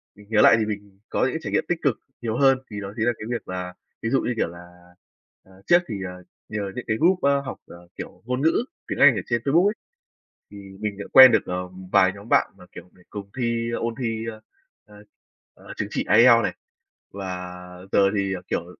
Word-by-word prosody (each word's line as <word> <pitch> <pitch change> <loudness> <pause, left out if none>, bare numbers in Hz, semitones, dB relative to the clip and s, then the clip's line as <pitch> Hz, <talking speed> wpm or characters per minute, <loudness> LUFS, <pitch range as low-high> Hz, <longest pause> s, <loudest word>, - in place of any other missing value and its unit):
mình 105 0 -17
nhớ 110 -1 +3
lại - - +7
thì 110 - +1
mình 100 -2 -7
có - - -1
những 130 - +1
cái 160 - -3
trải - - -4
nghiệm - - +2
tích 175 -2 -1
cực 135 -6 0 0.2
nhiều 115 0 -2
hơn. 135 -1 +4
Thì 105 -1 -5
đó 100 0 -7
chính 110 - 0
là 120 - +4
cái 105 - -6
việc 120 -1 -4
là 90 -1 -5 0.3
ví 115 - -2
dụ 135 +2 +2
như, 125 - -1
kiểu - - +1
là, 90 +1 -14 0.5
ờ, 95 0 -20
trước 175 - +6
thì, 110 - -4
ờ, 90 0 -10 0.3
nhờ 100 -2 -4
những 125 - -6
cái 110 - 0
group, 180 +5 +3
à, 140 - +3
học, 130 - -6
ờ, 85 0 -14
kiểu, - - -9
ngôn 125 +2 -2
ngữ 165 +10 +2 0.2
tiếng - - -4
Anh 140 -4 +7
ở 100 - -2
trên 120 -1 0
Facebook 165 +7 +4
ấy, 210 - +1 0.8
thì 105 - -12 0.2
mình 105 -2 -3
đã 100 - -5
quen 130 -1 +11
được, - - +2
ờ, 90 0 -4 0.2
vài 95 -2 +5
nhóm 100 +2 -12
bạn - - +3
mà, - - -16
kiểu, 90 - -12
để 90 - -22
cùng 100 -1 -8
thi 115 -1 -1
ôn 115 0 -2
thi, 115 -2 -2
à, 110 - -13 0.5
à, 105 - -18 0.6
à, - - -21
chứng - - -3
chỉ - - -2
IELTS 115 -1 +7
này. - - -2 0.6
Và 90 -2 -6 0.4
giờ - - +3 0.2
thì, 100 -1 0
ờ, 90 - -7
kiểu, 85 - -2
110 Hz, 235 wpm, -24 LUFS, 95-125 Hz, 0.8 s, quen